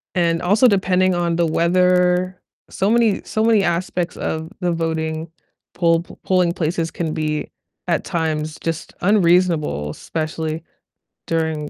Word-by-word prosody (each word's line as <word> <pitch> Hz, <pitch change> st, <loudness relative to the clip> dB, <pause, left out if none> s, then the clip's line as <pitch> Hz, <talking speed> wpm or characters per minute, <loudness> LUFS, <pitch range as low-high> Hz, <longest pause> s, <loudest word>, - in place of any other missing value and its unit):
and 170 Hz, -2 st, +2 dB
also 210 Hz, +8 st, +4 dB
depending 185 Hz, -2 st, +2 dB
on 170 Hz, -1 st, 0 dB
the 170 Hz, -1 st, +2 dB
weather. 180 Hz, +2 st, +2 dB, 0.3 s
So 195 Hz, -, 0 dB
many 230 Hz, -3 st, +3 dB
so 220 Hz, 0 st, -1 dB
many 220 Hz, -3 st, +4 dB
aspects 175 Hz, 0 st, -1 dB
of 160 Hz, 0 st, -3 dB
the 175 Hz, -2 st, 0 dB
voting 160 Hz, -1 st, -2 dB, 0.4 s
pol 165 Hz, -1 st, +2 dB, 0.2 s
polling 180 Hz, -2 st, +2 dB
places 165 Hz, -1 st, -1 dB
can 160 Hz, -2 st, -3 dB
be, 155 Hz, -2 st, -2 dB, 0.4 s
at 170 Hz, -2 st, +1 dB
times, 155 Hz, -3 st, -2 dB
just 165 Hz, -1 st, -4 dB
unreasonable, 170 Hz, -, +2 dB
especially 160 Hz, -, -4 dB, 0.7 s
during 160 Hz, -2 st, -1 dB
170 Hz, 130 wpm, -20 LUFS, 160-180 Hz, 0.7 s, also